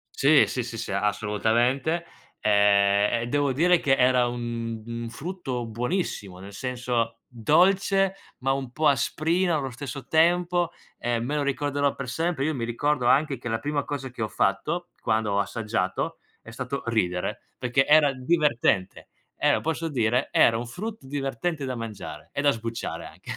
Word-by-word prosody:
Sì, 145 +1 +6
sì, 125 - -2
sì, 115 -1 -6
sì, 110 - -4
assolutamente. 115 - +1 0.3
Ehm, 100 +1 +3
e - - -4
devo 145 +1 +1
dire 175 +5 +4
che 135 -1 +3
era 125 -1 +4
un 115 -2 -4
un 115 0 -5
frutto 135 -4 -4
buonissimo, 115 - -3
nel 100 +2 -10
senso 120 -2 -2
dolce, 190 - +3 0.3
ma 135 +1 0
un 135 -2 -2
po' 155 +3 +1
asprino 160 +6 +2
allo 135 -3 -3
stesso 135 0 -7
tempo. 175 +1 +2 0.3
Ehm, 120 -1 -1
me 145 +3 -2
lo 145 - +1
ricorderò 140 0 0
per 135 - -6
sempre. 160 0 -1
Io 155 - 0
mi 120 -4 -3
ricordo 125 +2 0
anche 140 -1 +3
che 120 - -5
la 115 - 0
prima 145 +1 -2
cosa 135 -2 -4
che 120 - -8
ho 110 - 0
fatto 170 - -1
quando 110 -2 0
ho 100 - +1
assaggiato 105 -2 -2 0.2
è 115 - -11
stato 130 +3 -4
ridere, 90 -6 -1 0.2
perché 125 +2 +2
era 150 -2 +6
divertente. 130 - +1 0.3
Eh, - - +2
lo - - +1
posso 160 +1 -2
dire? 125 -1 +1
Era 115 -1 +5
un 120 +1 -4
frutto 205 - -6
divertente 140 +2 -2
da 130 -1 -3
mangiare 105 -9 -7
e 145 - -1
da 145 - +5
sbucciare 115 -1 -5
anche. - - -10
130 Hz, 165 wpm, -26 LUFS, 115-150 Hz, 0.3 s, Sì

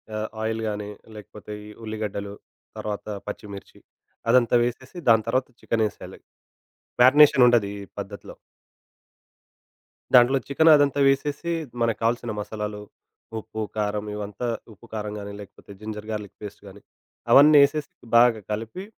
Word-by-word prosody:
ఆహ్, 110 0 -2
ఆయిల్ 110 0 -2
గానీ, 105 0 -5 0.3
లేకపోతే 105 0 -11 0.2
ఈ - - -11
ఉల్లిగడ్డలు, 105 -2 -5 0.4
తర్వాత 105 -1 -5 0.2
పచ్చిమిర్చి 100 -2 -9 0.5
అదంతా 125 0 +4
వేసేసి, 125 +6 -5
దాని 110 -2 +5
తర్వాత 130 +3 0
చికెనేసేయాలి. 110 -2 -3 0.8
మ్యారినేషన్ 130 0 +7
ఉండది 120 -5 +3
ఈ - - -8
పద్ధతిలో. - - -8 1.8
దాంట్లో 125 +2 +6
చికెనదంతా 145 -1 +4
వేసేసి, 145 +4 0 0.3
మనకు 115 -1 +1
కావాల్సిన 115 0 0
మసాలాలు, 105 0 -5 0.6
ఉప్పు, 110 0 -7 0.2
కారం 105 0 -1
ఇవంతా 105 +3 -5 0.3
ఉప్పు, 105 - -18
కారం 105 -1 -4
గానీ, 100 0 -7
లేకపోతే 100 0 -14
జింజర్ 105 0 -7
గా‌ర్లిక్ 105 -2 -6
పేస్ట్ 105 0 -9
గానీ, 100 +1 -13 0.5
అవన్నీ 150 +2 +8
ఏసేసి 150 0 -6 0.2
బాగా 120 -2 +5
కలిపి 115 - -5
110 Hz, 120 wpm, -24 LUFS, 105-125 Hz, 1.8 s, అవన్నీ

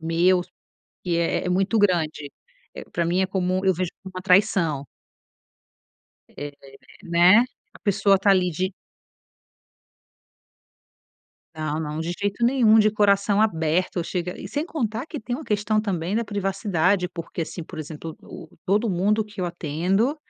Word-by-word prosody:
meus 175 +2 +2 0.6
que 175 -2 0
é 170 0 0
é - - 0
muito 195 +5 +1
grande, 160 -7 +1 0.4
eh, - - -8
pra 170 - 0
mim, 180 +3 +1
é - - +3
como 185 0 -1
eu 190 - +4
vejo 180 0 -2
como 190 - -10
uma 185 - -5
traição. 180 -7 +2 1.5
É, 145 0 -6 0.5
né, 175 +4 +6 0.4
a - - -14
pessoa 200 -1 +3
tá 200 +1 +3
ali 185 -2 +3
de 185 +4 -2 2.8
Não, 155 0 -3
não, 150 0 -4
de 165 +2 -2
jeito 205 +3 -1
nenhum, 235 -3 +5
de 215 0 +5
coração 205 0 +3
aberto. 170 -3 0
Eu 170 - -1
chega 180 0 -4
e - - -6
sem 295 +2 -2
contar 240 -8 -3
que 305 - -6
tem 245 +1 -4
uma 305 - -6
questão 210 -1 +1
também 185 -3 -2
da 230 +1 0
privacidade, 195 -2 0
porque 170 -1 -5
assim, 170 +1 -6
por 160 - -10
exemplo, 155 +1 -7
o - - -11 0.2
todo 205 +4 +1
mundo 205 +4 +1
que 210 -2 -9
eu - - 0
atendo 175 - 0
185 Hz, 155 wpm, -24 LUFS, 170-205 Hz, 2.8 s, né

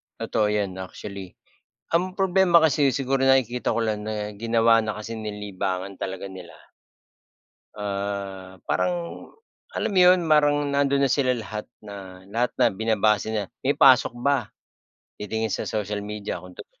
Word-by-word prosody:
Totoo 105 - 0
'yan 100 -3 -1
actually 95 0 -8 0.6
ang 185 +2 0
problema 190 -2 +4
kasi 150 -3 +4
siguro 135 +1 0
nakikita 130 -2 +2
ko - - 0
lang 110 -2 -1
na 105 -1 -4
ginawa 115 +1 +3
na 110 -1 -4
kasi 110 +2 -6
ni 110 -1 -5
libangan 100 -2 -4
talaga 95 0 -5
nila. 95 -3 -10 1.2
Ah, 100 -2 -4
parang 175 -1 -2 0.5
alam - - -1
mo 190 - +4
'yun 180 -1 +6
parang 145 -2 +3
nandun 140 0 +2
na 135 - +1
sila 130 -3 +2
lahat, 110 -1 -6 0.2
na 95 -2 -10
lahat 115 +5 0
na 120 -4 +3
binabase 110 0 +1
na, 110 -2 -1 0.2
"May 140 +2 0
pasok 130 -2 +5
ba?" 125 -4 0 0.7
titingin 110 0 -2
sa - - -3
social 105 -1 -2
media 105 -3 -5
kung 90 0 -13
totoo. - - -13
110 Hz, 150 wpm, -24 LUFS, 100-135 Hz, 1.2 s, yun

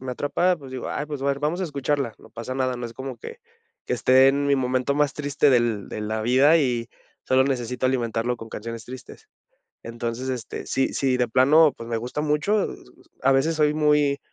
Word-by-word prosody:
me 130 -1 -5
atrapa, 175 +7 +1
pues 135 -4 -12
digo: 130 - -5
"Ay 150 - -3
pues, 145 -3 -6
a - - -3
ver, 140 0 0
vamos 150 +5 -1
a - - 0
escucharla", 140 -5 -2
no - - -17
pasa 115 +3 -7
nada, 130 -1 0
no 120 - -6
es 115 - -6
como 130 +1 -7
que 460 - -10 0.5
que - - -2
esté 130 +1 +5
en 140 +1 +1
mi 140 -1 +3
momento 130 +1 0
más 145 -1 +1
triste 145 0 +1
del 120 -5 +1
de - - -6
la 110 +1 -3
vida 130 +8 +4
y 120 -5 -1 0.4
solo 130 0 +3
necesito 125 -2 -1
alimentarlo 120 -1 -1
con 115 -1 -10
canciones 115 0 -7
tristes. 130 - -11 0.5
Entonces, 115 +2 -5
este, 125 -4 -6
si 135 - 0
si 130 -2 +1
de 125 - +1
plano, 140 +6 +5
pues, 115 - -9
me 115 -1 -1
gusta 125 +6 -4
mucho, 155 +8 +1 0.6
a 135 - +4
veces 135 +5 +2
soy 150 -1 +2
muy 150 -2 +2
130 Hz, 210 wpm, -24 LUFS, 120-145 Hz, 0.6 s, esté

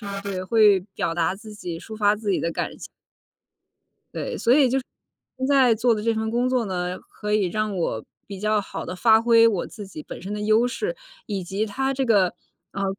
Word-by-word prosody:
啊， 200 -2 -5
对， 195 -2 -4
会 210 -1 +5
表 165 - -1
达 170 +2 +1
自 210 +1 -11
己， 175 -5 -6
抒 220 +4 -9
发 205 -1 +3
自 210 -1 -3
己 190 - +2
的 170 - -1
感 - - -3
情。 - - -9 1.3
对， - - -4
所 240 +2 +4
以 280 -3 +5
就 270 - +2
是， 260 - -6 0.5
现 260 - -3
在 260 -5 +5
做 235 +2 +2
的 215 - -1
这 230 +1 +1
份 220 0 -2
工 245 +2 +1
作 255 -2 +1
呢， 180 -1 -2
可 210 0 -6
以 205 -3 +2
让 215 +2 -2
我， 115 -10 -2 0.2
比 195 -2 -7
较 215 +1 +1
好 - - -7
地 - - -5
发 220 +3 +5
挥 230 -1 +6
我 195 -6 -1
自 205 -4 -10
己 155 -5 -9
本 - - -9
身 195 +3 -5
的 210 - -3
优 215 +3 +3
势， 440 - -3 0.3
以 200 -3 -3
及 195 +5 -2
它 265 +6 -1
这 265 -1 -1
个， 195 -6 +3 0.4
呃， 200 -1 -3
215 Hz, 240 characters per minute, -24 LUFS, 195-230 Hz, 1.3 s, 挥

